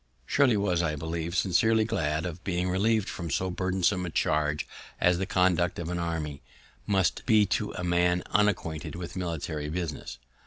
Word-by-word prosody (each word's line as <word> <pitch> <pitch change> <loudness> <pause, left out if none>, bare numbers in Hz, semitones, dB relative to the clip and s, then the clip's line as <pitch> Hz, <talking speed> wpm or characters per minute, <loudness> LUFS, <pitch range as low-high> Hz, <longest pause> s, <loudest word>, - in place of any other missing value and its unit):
Shirley 130 -6 +3
was, 90 -4 +1
I 75 -2 0
believe, 80 +3 -3
sincerely 110 +4 +3
glad 80 -8 -1
of 90 0 -6
being 90 -1 -1
relieved 105 +2 +2
from 85 -2 -5
so 95 +5 0
burdensome 95 +1 0
a 90 - -3
charge 75 -1 0 0.3
as 90 0 +3
the 95 - -1
conduct 90 -4 +2
of 85 -1 -4
an 90 0 -2
army 80 -4 -3 0.5
must 95 -3 +1
be 110 -3 +5
to - - -1
a 90 - -5
man 90 0 +2
unacquainted 90 -7 0
with 90 -1 -6
military 80 -4 -3
business. 80 -2 -4
90 Hz, 165 wpm, -28 LUFS, 80-95 Hz, 0.5 s, be